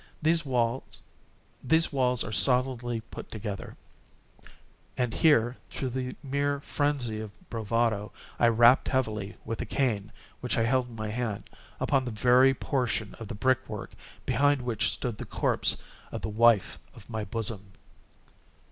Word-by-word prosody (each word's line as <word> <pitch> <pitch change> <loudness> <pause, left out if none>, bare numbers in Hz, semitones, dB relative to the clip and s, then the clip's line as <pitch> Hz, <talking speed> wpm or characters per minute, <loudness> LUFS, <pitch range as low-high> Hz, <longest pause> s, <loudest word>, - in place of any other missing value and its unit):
—these 165 +1 +3
walls 125 +2 -1
are - - -6
solidly 125 0 +2
put - - -8
together;" 105 -2 -6 1.2
and 125 -3 0
here, 125 -6 +3
through 130 - -3
the 125 0 -4
mere 140 +1 0
phrenzy 140 -6 -1
of 110 -1 -5 0.2
bravado, 115 -2 0 0.3
I 120 - +5
rapped 120 +2 +5
heavily, 110 -6 -1
with 115 - -3
a - - -3
cane 110 -6 -1 0.3
which 125 +1 -2
I 115 - +3
held 125 +2 +1
in 115 - -11
my 110 -1 -4
hand, 110 -3 -3 0.3
upon 135 -2 +1
that 120 -3 -5
very 130 +3 +5
portion 125 -6 -1
of 115 - -7
the 110 - -6
brick 130 +4 +1
work 105 -2 -6 0.3
behind 145 -2 +2
which 120 -3 0
stood 120 -4 -4
the - - -5
corpse - - +2 0.3
of - - -5
the - - -3
wife 110 -1 +3 0.2
of - - -14
my 110 -2 -4
bosom. 105 -1 -4
120 Hz, 145 wpm, -28 LUFS, 110-130 Hz, 1.2 s, I